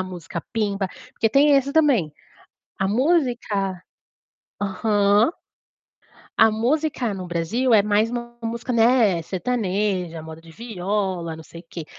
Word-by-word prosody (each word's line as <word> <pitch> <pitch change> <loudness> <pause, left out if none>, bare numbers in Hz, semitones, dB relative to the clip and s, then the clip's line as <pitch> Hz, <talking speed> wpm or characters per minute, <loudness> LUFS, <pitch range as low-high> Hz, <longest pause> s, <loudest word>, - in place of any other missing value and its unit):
a - - +1
música 175 -2 -7
pimba. 200 -4 -1 0.2
Porque 225 - +1
tem 285 +4 +5
esse 275 +1 0
também 275 - +3 0.7
a 190 0 0
música 235 - 0 0.8
aham. 205 - +2 1.1
A 220 0 +7
música 250 +2 0
no 185 -2 -6
Brasil 210 +9 +1
é 205 - +6
mais 210 +2 +2
uma 240 0 -6
música, 235 +2 -3
né, 225 -6 +4
sertaneja, 185 -3 -2
moda 160 0 -10
de 165 0 -16
viola, 190 -4 -3
não 160 - -10
sei 165 +2 -12
quê. 165 -2 -8
205 Hz, 130 wpm, -23 LUFS, 180-240 Hz, 1.1 s, A